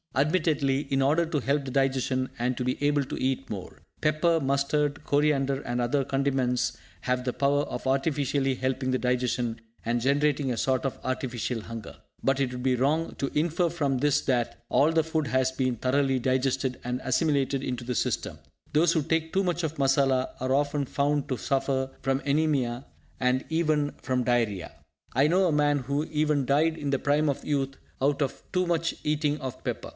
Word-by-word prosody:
Admittedly, 145 Hz, -2 st, +2 dB
in 135 Hz, 0 st, +2 dB
order 155 Hz, +5 st, +3 dB
to 160 Hz, -2 st, -1 dB
help 140 Hz, +2 st, 0 dB
the 135 Hz, -, -6 dB
digestion, 130 Hz, -1 st, +1 dB
and 125 Hz, +1 st, -1 dB
to 125 Hz, -, -2 dB
be 125 Hz, -, 0 dB
able 145 Hz, -1 st, +3 dB
to 130 Hz, -, -6 dB
eat 135 Hz, +1 st, -1 dB
more. 95 Hz, -4 st, -6 dB, 0.2 s
Pepper, 155 Hz, +2 st, +2 dB
mustard, 145 Hz, +2 st, 0 dB
coriander 140 Hz, -2 st, +2 dB
and 120 Hz, -2 st, -3 dB
other 125 Hz, +3 st, +1 dB
condiments 135 Hz, -2 st, 0 dB, 0.3 s
have 125 Hz, 0 st, -1 dB
the 125 Hz, -, -1 dB
power 140 Hz, +2 st, +2 dB
of 140 Hz, -, -5 dB
artificially 135 Hz, -1 st, +1 dB
helping 130 Hz, 0 st, -1 dB
the 130 Hz, -, +2 dB
digestion, 125 Hz, -2 st, -1 dB, 0.2 s
and 120 Hz, +1 st, 0 dB
generating 140 Hz, +1 st, +2 dB
a 120 Hz, -, -2 dB
sort 130 Hz, +1 st, +1 dB
of 135 Hz, -, -3 dB
artificial 125 Hz, -2 st, -2 dB
hunger. 115 Hz, -1 st, -8 dB, 0.3 s
But 135 Hz, 0 st, +1 dB
it 130 Hz, -2 st, 0 dB
would 125 Hz, 0 st, -6 dB
be 130 Hz, -1 st, +3 dB
wrong 150 Hz, +6 st, 0 dB
to 140 Hz, -, -1 dB
to -, -, 0 dB
infer 170 Hz, +2 st, +1 dB
from 145 Hz, -6 st, 0 dB
this 145 Hz, +1 st, +3 dB
that 125 Hz, -3 st, -1 dB
all 150 Hz, +3 st, +3 dB
the 165 Hz, -1 st, +3 dB
food 160 Hz, -2 st, -1 dB
has 130 Hz, 0 st, +1 dB
been 130 Hz, -2 st, 0 dB
thoroughly 135 Hz, +2 st, +1 dB
digested, 130 Hz, 0 st, 0 dB
and 125 Hz, +1 st, -2 dB
assimilated 135 Hz, 0 st, +1 dB
into 125 Hz, -2 st, -3 dB
the 125 Hz, 0 st, -2 dB
system. -, -, -1 dB, 0.4 s
Those 160 Hz, +3 st, +4 dB
who 160 Hz, -3 st, +1 dB
take 160 Hz, +1 st, 0 dB
too 195 Hz, 0 st, +1 dB
much 175 Hz, -1 st, -1 dB
of 160 Hz, 0 st, -2 dB
masala 135 Hz, -1 st, +2 dB
are 130 Hz, 0 st, -1 dB
often 145 Hz, 0 st, +1 dB
found 145 Hz, +1 st, 0 dB
to 130 Hz, -, -1 dB
suffer 135 Hz, +2 st, 0 dB
from 135 Hz, 0 st, 0 dB
anaemia, 140 Hz, -4 st, +1 dB, 0.3 s
and 125 Hz, +1 st, +1 dB
even 155 Hz, -3 st, +1 dB
from 125 Hz, -1 st, 0 dB
diarrhea. 115 Hz, -7 st, 0 dB, 0.4 s
I 135 Hz, +4 st, +4 dB
know 185 Hz, +3 st, +3 dB
a 165 Hz, -, +1 dB
man 145 Hz, 0 st, +3 dB
who 140 Hz, +3 st, -1 dB
even 150 Hz, -3 st, +1 dB
died 155 Hz, +4 st, +2 dB
in 145 Hz, -, -3 dB
the 135 Hz, -1 st, +1 dB
prime 145 Hz, +1 st, +2 dB
of 140 Hz, -, -3 dB
youth 135 Hz, -2 st, -1 dB, 0.2 s
out 140 Hz, +2 st, +2 dB
of 140 Hz, -, -2 dB
too 180 Hz, -1 st, +1 dB
much 165 Hz, -1 st, 0 dB
eating 150 Hz, 0 st, 0 dB
of 130 Hz, -1 st, -6 dB
pepper. -, -, -4 dB
135 Hz, 190 wpm, -27 LUFS, 130-150 Hz, 0.4 s, Those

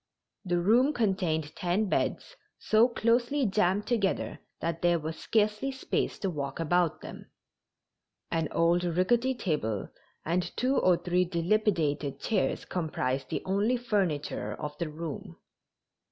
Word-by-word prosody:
The 175 Hz, -3 st, 0 dB
room 240 Hz, +11 st, +4 dB
contained 180 Hz, -, 0 dB
ten 185 Hz, +4 st, 0 dB
beds, -, -, -1 dB, 0.2 s
so 220 Hz, +2 st, +4 dB
closely 240 Hz, +3 st, +1 dB
jammed 200 Hz, 0 st, +1 dB
together 210 Hz, -5 st, 0 dB, 0.2 s
that 165 Hz, 0 st, -3 dB
there 175 Hz, 0 st, +3 dB
was 160 Hz, 0 st, -4 dB
scarcely 215 Hz, +7 st, 0 dB
space 265 Hz, -, -2 dB
to 195 Hz, -, -2 dB
walk 140 Hz, -2 st, -4 dB
about 170 Hz, 0 st, +1 dB
them. -, -, -10 dB, 1.0 s
An 165 Hz, -1 st, 0 dB
old 170 Hz, +1 st, +2 dB
rickety 210 Hz, +10 st, +2 dB
table 145 Hz, -, -2 dB, 0.4 s
and 175 Hz, +2 st, -1 dB
two 260 Hz, +2 st, +1 dB
or 180 Hz, -7 st, +4 dB
three 180 Hz, +1 st, +1 dB
dilapidated 170 Hz, -5 st, 0 dB
chairs 225 Hz, -, 0 dB
comprised 140 Hz, -6 st, -2 dB
the -, -, -3 dB
only 205 Hz, +6 st, +1 dB
furniture 195 Hz, -11 st, -1 dB
of 150 Hz, 0 st, -5 dB
the 170 Hz, -, -2 dB
room. 150 Hz, -, -6 dB
180 Hz, 130 wpm, -29 LUFS, 160-215 Hz, 1.0 s, room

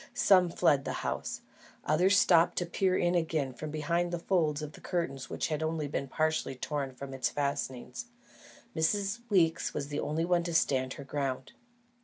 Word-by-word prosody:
Some 185 Hz, -3 st, +5 dB
fled 140 Hz, -4 st, +3 dB
the -, -, -3 dB
house; -, -, -3 dB, 0.4 s
others 180 Hz, +6 st, +4 dB
stopped 170 Hz, -2 st, +4 dB
to 175 Hz, -, +1 dB
peer 185 Hz, +2 st, +1 dB
in 175 Hz, 0 st, +2 dB
again 160 Hz, -6 st, 0 dB
from 155 Hz, +5 st, -6 dB
behind 170 Hz, +3 st, -1 dB
the 175 Hz, -, -1 dB
folds 160 Hz, -4 st, 0 dB
of 150 Hz, -, -6 dB
the -, -, -14 dB
curtain 170 Hz, -6 st, -2 dB
which -, -, -3 dB
had 155 Hz, -2 st, -1 dB
been 160 Hz, -, 0 dB
only 160 Hz, -2 st, -2 dB
partially 155 Hz, +1 st, -1 dB
torn 140 Hz, +1 st, -3 dB
from 135 Hz, +1 st, -8 dB
its 130 Hz, -1 st, 0 dB
fastenings. 140 Hz, -, -3 dB, 0.7 s
Miss 200 Hz, +6 st, 0 dB
Weeks 170 Hz, -6 st, +2 dB
was 145 Hz, -1 st, -3 dB
the 145 Hz, 0 st, -3 dB
only 160 Hz, +2 st, -1 dB
one 175 Hz, 0 st, +2 dB
to 170 Hz, -2 st, -3 dB
stand 130 Hz, -4 st, +2 dB
her 140 Hz, -, -8 dB
ground. 135 Hz, -2 st, -3 dB
155 Hz, 180 wpm, -30 LUFS, 140-175 Hz, 0.7 s, Some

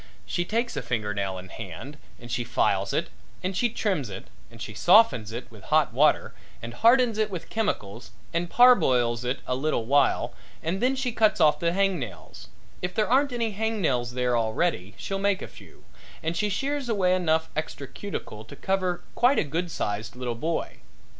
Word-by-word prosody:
She 175 Hz, -, -1 dB
takes 230 Hz, +5 st, -1 dB
a -, -, -2 dB
finger 110 Hz, -4 st, -2 dB
nail 100 Hz, -2 st, -2 dB
in 90 Hz, 0 st, -9 dB
hand 100 Hz, -, -8 dB, 0.2 s
and 120 Hz, 0 st, -10 dB
she 120 Hz, -, -1 dB
files 120 Hz, +1 st, +1 dB
it -, -, -1 dB, 0.3 s
and 185 Hz, +1 st, -2 dB
she 240 Hz, +6 st, +2 dB
trims 190 Hz, -, -1 dB
it 95 Hz, -, -9 dB, 0.2 s
and 115 Hz, -, -15 dB
she 110 Hz, -, -6 dB
softens 175 Hz, -, +5 dB
it 120 Hz, +2 st, -7 dB
with 110 Hz, -3 st, -14 dB
hot 155 Hz, -6 st, +2 dB
water 150 Hz, +5 st, +3 dB, 0.3 s
and 120 Hz, +1 st, -7 dB
hardens 230 Hz, -, +4 dB
it 215 Hz, -1 st, +2 dB
with 180 Hz, -4 st, -7 dB
chemicals 120 Hz, -, -2 dB, 0.2 s
and 170 Hz, +1 st, -1 dB
parboils 130 Hz, -, +5 dB
it 125 Hz, +2 st, -2 dB
a -, -, -1 dB
little 130 Hz, -3 st, -1 dB
while 140 Hz, +4 st, +2 dB, 0.3 s
and 175 Hz, +4 st, -2 dB
then 255 Hz, +2 st, +2 dB
she 260 Hz, -2 st, -1 dB
cuts 220 Hz, -2 st, +2 dB
off 150 Hz, -1 st, +4 dB
the 170 Hz, 0 st, +1 dB
hang 195 Hz, -1 st, +1 dB
nails 90 Hz, -, -8 dB, 0.3 s
if 180 Hz, 0 st, -3 dB
there 215 Hz, -1 st, +2 dB
aren't 275 Hz, +3 st, +3 dB
any 230 Hz, -2 st, -1 dB
hang 220 Hz, +2 st, -2 dB
nails 125 Hz, -8 st, 0 dB
there 125 Hz, -1 st, +1 dB
already 110 Hz, -, 0 dB
she'll 195 Hz, 0 st, -3 dB
make 200 Hz, -1 st, +1 dB
a -, -, -6 dB
few -, -, -16 dB, 0.4 s
and 165 Hz, +1 st, -1 dB
she 210 Hz, +3 st, 0 dB
shears 275 Hz, +5 st, -2 dB
away 190 Hz, -5 st, +2 dB
enough 160 Hz, -3 st, +1 dB
extra 155 Hz, -2 st, -4 dB
cuticle 135 Hz, -, -7 dB
to 140 Hz, -, -11 dB
cover 185 Hz, +1 st, -1 dB
quite 250 Hz, +3 st, +3 dB
a -, -, +3 dB
good 165 Hz, +4 st, -2 dB
sized 105 Hz, -5 st, -3 dB
little 125 Hz, -1 st, -3 dB
boy. 160 Hz, +8 st, -3 dB
160 Hz, 190 wpm, -26 LUFS, -, 0.4 s, softens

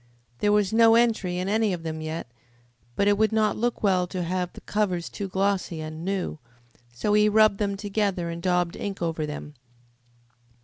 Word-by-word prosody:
There 205 Hz, -, +2 dB
was 210 Hz, -1 st, +2 dB
no 225 Hz, 0 st, +6 dB
entry 220 Hz, -6 st, +2 dB
in 180 Hz, +1 st, -2 dB
any 215 Hz, 0 st, +1 dB
of 170 Hz, -2 st, -5 dB
them 160 Hz, -1 st, -4 dB
yet, 155 Hz, +1 st, -4 dB, 0.7 s
but 200 Hz, -, +2 dB
it 205 Hz, 0 st, +3 dB
would 220 Hz, 0 st, +3 dB
not 215 Hz, -2 st, +2 dB
look 240 Hz, +1 st, -2 dB
well 185 Hz, -3 st, +2 dB
to 180 Hz, 0 st, -3 dB
have 180 Hz, +1 st, -2 dB
the -, -, -12 dB
covers 185 Hz, -5 st, -1 dB
too 200 Hz, -, -5 dB
glossy 190 Hz, -3 st, -1 dB
and 155 Hz, +1 st, -6 dB
new, 190 Hz, -4 st, -2 dB, 0.5 s
so 165 Hz, -, -1 dB
he 210 Hz, 0 st, +5 dB
rubbed 215 Hz, -1 st, +4 dB
them 200 Hz, -2 st, -1 dB
together 200 Hz, -3 st, -1 dB
and 170 Hz, 0 st, -6 dB
daubed 180 Hz, -1 st, +1 dB
ink 195 Hz, -3 st, -4 dB
over 160 Hz, -2 st, -2 dB
them. 150 Hz, 0 st, -7 dB
195 Hz, 185 wpm, -25 LUFS, 175-210 Hz, 0.7 s, no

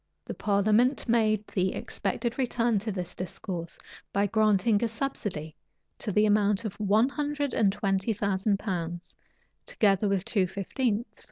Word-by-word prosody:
The -, -, -5 dB
parliament 215 Hz, +7 st, +2 dB
made 215 Hz, -2 st, +2 dB
the 185 Hz, -2 st, -1 dB
expected 240 Hz, +1 st, -3 dB
return 240 Hz, -4 st, +1 dB
to 215 Hz, +2 st, -3 dB
this 180 Hz, -3 st, -5 dB
discourse, 175 Hz, -1 st, -6 dB, 0.3 s
by 200 Hz, +1 st, +2 dB
granting 215 Hz, 0 st, +2 dB
a -, -, +3 dB
subsidy 205 Hz, -, -4 dB, 0.4 s
to 210 Hz, -, -2 dB
the 210 Hz, +2 st, +3 dB
amount 210 Hz, 0 st, +2 dB
of 210 Hz, -, -3 dB
one 210 Hz, +3 st, +3 dB
hundred 290 Hz, -1 st, -2 dB
and 205 Hz, -4 st, +3 dB
twenty 195 Hz, +1 st, 0 dB
thousand 200 Hz, 0 st, 0 dB
pounds, 175 Hz, -4 st, -4 dB, 0.5 s
together 200 Hz, -1 st, +2 dB
with 195 Hz, -1 st, 0 dB
two 195 Hz, -5 st, +1 dB
fifteenths. 215 Hz, +5 st, -2 dB
205 Hz, 145 wpm, -28 LUFS, 195-230 Hz, 0.5 s, a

